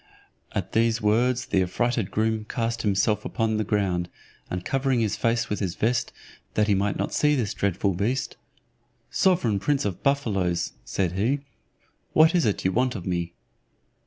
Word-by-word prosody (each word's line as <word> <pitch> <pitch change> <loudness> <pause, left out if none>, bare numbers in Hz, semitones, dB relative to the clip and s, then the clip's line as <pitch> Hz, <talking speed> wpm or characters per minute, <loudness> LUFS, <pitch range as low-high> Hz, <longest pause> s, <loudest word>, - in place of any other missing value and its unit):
At 100 -6 -3
these 115 0 +2
words 120 +4 +2
the 95 - +1
affrighted 115 +3 0
groom 110 0 0
cast 115 0 -2
himself 105 +1 +1
upon 115 -2 -1
the 110 - +1
ground, 95 -5 0 0.4
and 90 0 -4
covering 135 -2 +1
his 110 -3 0
face 115 0 +1
with 105 - -2
his 95 -3 -2
vest, 120 +2 0 0.4
that 105 0 +3
he 105 - +3
might 100 +1 +1
not 100 - -2
see 150 0 +3
this 115 -7 -1
dreadful 100 0 0
beast, 115 +9 -1 0.8
"Sovereign 145 - +2
prince 140 +4 0
of 100 -4 -3
buffaloes," 100 -11 0
said 95 -3 -1
he, 115 +10 0 0.7
"what 160 +1 +6
is 175 -8 +3
it 100 - -1
you 95 - +3
want 125 +5 +1
of 95 - -6
me?" 85 -2 -2
110 Hz, 165 wpm, -25 LUFS, 95-120 Hz, 0.8 s, what